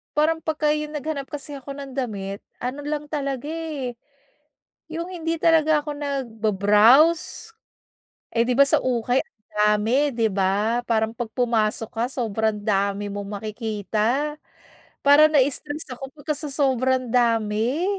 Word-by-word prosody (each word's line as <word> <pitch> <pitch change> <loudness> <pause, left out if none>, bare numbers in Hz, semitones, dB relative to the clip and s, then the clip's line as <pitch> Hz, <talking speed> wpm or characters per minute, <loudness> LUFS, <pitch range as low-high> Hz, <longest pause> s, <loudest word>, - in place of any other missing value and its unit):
parang 315 +2 +2
pagka 310 -1 +1
'yong 300 0 -4
naghanap 295 -1 -3
kasi 290 0 -6
ako 275 +1 -8
ng 275 -2 -8
damit, 200 -6 -4 0.2
ano 255 +4 -4
lang 295 0 -3
talaga 280 -3 -3
eh, 305 -6 -4 1.0
yung 335 +2 -4
hindi 330 -2 -2
talaga 315 -2 +4
ako 300 - -4
nagba-browse. 250 - +3 0.8
Eh, 230 0 +3
'di 250 - +2
ba 280 - +9
sa - - +4
ukay 250 0 +1
ang 215 - -38
dami, 210 +2 +3 0.2
'di 230 -1 +1
ba? 205 +5 +1
Parang 220 -1 +1
'pag 240 -2 -3
pumasok 225 -2 +1
ka, - - +2
sobrang 220 -4 -1
dami 200 0 0
mong 205 0 -5
makikita 220 +6 -1 0.7
parang 290 +2 +7
na-stress 290 +2 +1
ako 270 +2 -7
pagka 305 +1 -3
sa 300 0 -5
sobrang 260 -2 +1
dami. 230 +4 +1
255 Hz, 135 wpm, -23 LUFS, 220-295 Hz, 1.0 s, ba